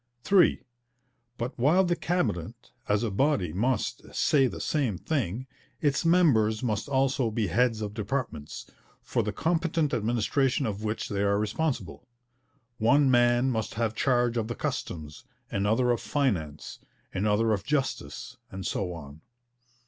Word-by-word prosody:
(3) 190 -4 +4 0.7
But 120 +2 -4
while 160 +10 +4
the 175 -1 +1
Cabinet 120 - -2 0.2
as 105 +2 +2
a 115 - -1
body 115 - +1
must 115 +3 -2
'say 135 -3 +3
the - - -6
same 130 - 0
thing,' 125 - -2 0.3
its 145 0 +1
members 130 -11 +3
must 110 +2 -1
also 135 -3 +1
be 110 0 -1
heads 115 +3 +2
of 105 -1 -4
departments, 105 - -4 0.4
for - - 0
the - - -2
competent 165 -3 0
administration 120 +4 +1
of 105 -1 -3
which 110 +1 -2
they 100 -1 -2
are 100 0 +2
responsible. 115 - -2 0.7
One 135 +5 +4
man 120 +1 +4
must 110 -3 -3
have 115 0 0
charge 120 -1 +1
of 110 -1 -1
the 120 - -4
Customs, 85 - -5 0.3
another 110 +5 +2
of 120 - 0
Finance, 85 - -2 0.3
another 105 +3 +2
of 100 -2 -2
Justice, 135 - -3
and 95 0 -7
so 90 -3 -2
on. 75 -2 -10
120 Hz, 140 wpm, -28 LUFS, 105-135 Hz, 0.7 s, 3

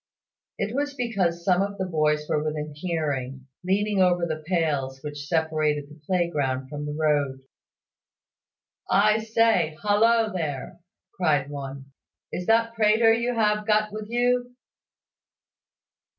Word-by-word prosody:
It 215 - -2
was 285 0 -1
because 190 -9 -1
some 180 -1 +3
of 200 0 -2
the 190 - -2
boys 150 -3 0
were 150 - 0
within 150 -1 -3
hearing, 145 -6 -3 0.2
leaning 200 +2 +1
over 175 -1 +3
the 155 -2 -4
pales 145 -7 0
which 145 -1 -6
separated 155 -3 0
the 150 0 -15
playground 145 -8 0
from 150 0 -5
the 150 - -4
road. 145 -4 +1 1.5
"I 215 +2 +4
say; 220 -8 +2
hollo 220 +2 +3
there!" 150 -7 -4 0.4
cried 145 -6 +1
one. 135 -1 -7 0.4
"Is 180 - -4
that 230 0 +3
Prater 225 0 +4
you 235 +2 0
have 210 -1 +1
got 215 0 +2
with 215 0 -6
you?" 245 +1 0
175 Hz, 130 wpm, -25 LUFS, 150-215 Hz, 1.5 s, I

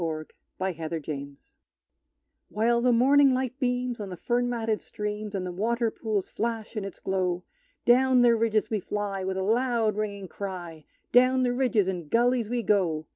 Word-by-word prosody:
Song 165 - 0
of - - -10 0.3
the 190 0 -1
Cattle 165 0 -4
Hunters 140 -2 -7 1.0
While 235 +3 +2
the 250 +1 +3
morning 270 +3 +5
light 260 0 -3
beams 250 -2 -1
on 205 -2 -5
the 180 - -7
fern 245 +5 0
matted 225 -3 -1
streams, 210 0 -5
And 185 -1 -2
the 180 - -4
water 230 +5 0
pools 215 -4 -2
flash 230 0 -4
in 210 - -2
its 195 - -7
glow, 180 -2 -1 0.4
Down 255 +1 +5
the 235 -1 +5
ridges 220 -1 +1
we 215 - +1
fly, 200 0 -3
with 190 0 -2
a 190 - -1
loud 230 0 +1
ringing 200 -2 -3
cry 175 -5 -7 0.3
Down 255 +1 +5
the 245 -1 +1
ridges 245 -6 +2
and 175 -5 -4
gullies 240 -1 +2
we 240 -1 -1
go! 180 -7 +1
215 Hz, 180 wpm, -27 LUFS, 190-245 Hz, 1.0 s, morning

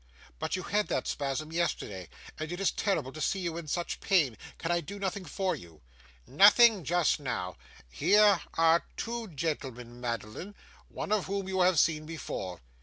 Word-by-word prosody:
'But - - -1
you 185 - -4
had 210 +3 0
that 130 - -1
spasm 145 +2 -2
yesterday, 105 - -2 0.3
and 155 +1 -4
it 175 - -4
is 195 - +2
terrible 195 -10 -1
to 155 - -7
see 195 - +1
you 170 -3 -3
in 170 -2 -6
such 175 +4 -2
pain. 155 - +2 0.2
Can 165 - -2
I 170 0 +2
do 200 +6 -8
nothing 195 -1 -3
for 185 +4 -1
you?' 85 -3 -13 0.4
'Nothing 210 - +6
just 175 +1 +2
now. 115 -10 -3 0.3
Here 200 - +4
are 165 +1 +4
two 230 0 -3
gentlemen, 130 - -4
Madeline, 115 - -5 0.3
one - - -6
of 215 -3 +2
whom 195 0 -2
you 190 -1 0
have 180 -1 +4
seen 155 0 +2
before. 95 - -5
165 Hz, 175 wpm, -30 LUFS, 135-195 Hz, 0.4 s, Nothing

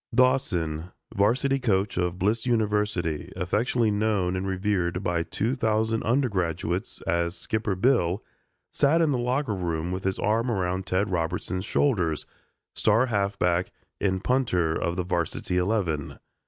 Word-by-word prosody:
Dawson, 90 -11 +1 0.3
varsity 130 +7 +2
coach 105 -5 +1
of 90 -1 -1
Bliss 110 +5 0
University, 105 -8 0
affectionately 110 +5 +1
known 105 -3 +1
and 95 +1 -2
revered 95 -2 -1
by 85 -2 0
two 110 +8 -1
thousand 110 -1 +1
undergraduates 95 - -1
as 85 +2 0
"Skipper 110 -3 -1
Bill" 95 -3 +2 0.5
sat 145 +4 +3
in 160 -3 +3
the 130 - 0
locker 125 0 0
room 85 -2 -2
with 95 +1 -3
his 95 0 -1
arm 115 +4 +1
around 95 -3 -1
Ted 95 +2 0
Robertson's 90 +2 -2
shoulders, 90 - +1 0.5
star 115 +4 +3
halfback 100 -5 0 0.3
and 95 -1 0
punter 90 -11 +1
of 85 +1 -1
the 90 - -1
varsity 90 0 -1
eleven. 90 -6 -1
95 Hz, 135 wpm, -26 LUFS, 90-115 Hz, 0.5 s, sat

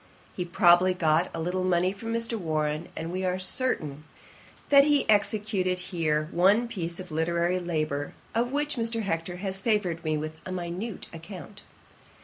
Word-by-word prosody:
He 180 - -2
probably 175 0 +5
got 165 0 +2
a 165 - -5
little 180 +3 -1
money 180 0 +2
from 225 +3 -6
Mr. 230 0 -1
Warren; 155 -4 -1
and 165 +1 -4
we 185 +1 -2
are 185 0 0
certain, 180 - -1 0.7
that 280 -1 +8
he 290 -1 +3
executed 205 -3 +1
here 165 -4 -1
one 200 +7 +4
piece 170 -6 -4
of 185 -2 -8
literary 170 +3 +1
labour, 155 -4 -2 0.2
of 240 +2 0
which 295 0 -1
Mr. 230 -1 -1
Hector 170 -2 -2
has 190 +1 -4
favoured 195 -7 0
me 155 -1 0
with 155 +1 -6
a 185 - -6
minute 185 +4 -4
account. 185 +4 -9
180 Hz, 160 wpm, -27 LUFS, 165-210 Hz, 0.7 s, that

